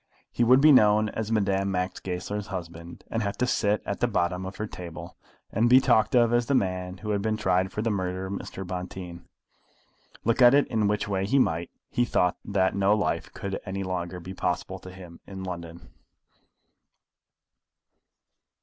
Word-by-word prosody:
He 120 - +1
would 130 +3 +6
be 155 +1 +7
known 105 -4 +5
as 110 0 -4
Madame 100 -2 +1 0.3
Goesler's 100 +3 -4
husband, 85 -3 -8
and 115 - -1
have 100 -2 -3
to 125 - +1
sit 105 -4 +1
at 100 - -3
the 120 - +2
bottom 90 -4 -1
of 95 - -8
her 105 - -3
table, 90 -5 -9 0.4
and 115 +3 +2
be 130 +1 +8
talked 130 0 +3
of 120 -1 +4
as 120 -1 +2
the 140 - +2
man 90 -3 -1
who 105 +2 -4
had 100 -1 0
been 110 +1 -1
tried 95 -3 +1
for 105 - -3
the 115 - 0
murder 95 -1 -2
of 95 - -5
Mr. 95 -1 -6
Bonteen. 90 -1 -7 1.0
Look 115 +3 +1
at 125 +2 +8
it 145 - +4
in 110 -3 +1
which 105 0 0
way 95 -1 -1
he 135 - +2
might, 85 -9 +1 0.2
he 120 - +2
thought 90 -7 +1
that 95 -2 +1
no 100 +1 +3
life 105 - -1
could 100 -1 -4
any 95 0 -4
longer 90 -1 -4
be 90 +2 -8
possible 95 +1 -2
to 95 - -11
him 90 -2 -12
in 95 -1 -7
London. 85 -2 -7
100 Hz, 185 wpm, -26 LUFS, 90-110 Hz, 1.0 s, be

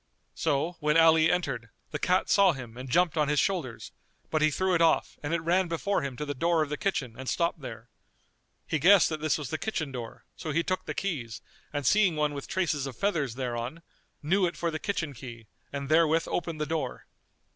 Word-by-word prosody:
So, 160 +3 -1
when 150 0 +2
Ali 160 -1 +6
entered, 135 -10 -2 0.2
the - - -3
cat 185 +1 +2
saw 195 -3 +5
him 125 -5 -9
and 130 +1 -7
jumped 175 +4 +2
on 150 -1 +3
his 150 0 +2
shoulders; 160 - -2 0.4
but 155 - +1
he 155 - +5
threw 185 +5 0
it 170 - +2
off 165 - +2
and 145 - -4
it 170 -1 0
ran 175 +3 +2
before 170 +4 0
him 135 -3 -5
to 150 - -3
the 145 - -3
door 165 +3 +2
of 150 - -6
the 150 - -1
kitchen 155 - -1
and 130 - -4
stopped 170 -1 0
there. 115 -3 -8 0.8
He 160 - -1
guessed 190 +4 +6
that 155 -2 -4
this 155 -4 +1
was 145 -5 -6
the 160 - -2
kitchen 160 -10 -2
door; 120 -3 -7
so 160 - -6
he 165 +3 +1
took 185 +1 -2
the - - -3
keys 130 - -3 0.3
and 145 -2 -3
seeing 200 - +4
one 150 -1 0
with 140 -1 -6
traces 155 -7 -1
of 130 -4 -8
feathers 155 - 0
thereon, 125 +5 -4 0.4
knew 185 +5 +3
it 170 - -6
for 170 -1 -1
the 155 - -3
kitchen 165 -8 -2
key 115 -2 -10 0.3
and 140 -1 -4
therewith 160 +1 +3
opened 165 -3 -2
the 150 - 0
door. 155 -5 -3
155 Hz, 220 wpm, -28 LUFS, 135-170 Hz, 0.8 s, Ali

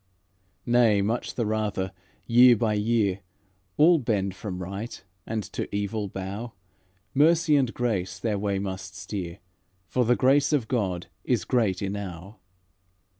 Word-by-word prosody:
Nay 120 -4 +4
much 115 +4 -2
the 120 - 0
rather, 105 -3 -1 0.3
year 120 +1 +7
by 110 0 0
year, 105 -2 +1 0.6
All 165 +2 +6
bend 100 -6 -1
from 95 -1 -6
right 100 +6 -6 0.3
and 110 -1 -2
to - - -3
evil 105 +1 -2
bow; 100 +5 -6 0.6
Mercy 160 +2 +4
and 130 -4 +2
grace 95 -8 -2
their 105 +1 -1
way 100 -1 -1
must 95 -1 -5
steer, 90 -4 -5 0.5
For 125 +7 0
the 120 +1 +3
grace 140 +4 +3
of 130 -7 +1
God 95 -8 -1 0.2
is 120 -8 0
great 105 -7 +1
enow." 95 -1 -6
105 Hz, 135 wpm, -26 LUFS, 95-120 Hz, 0.6 s, year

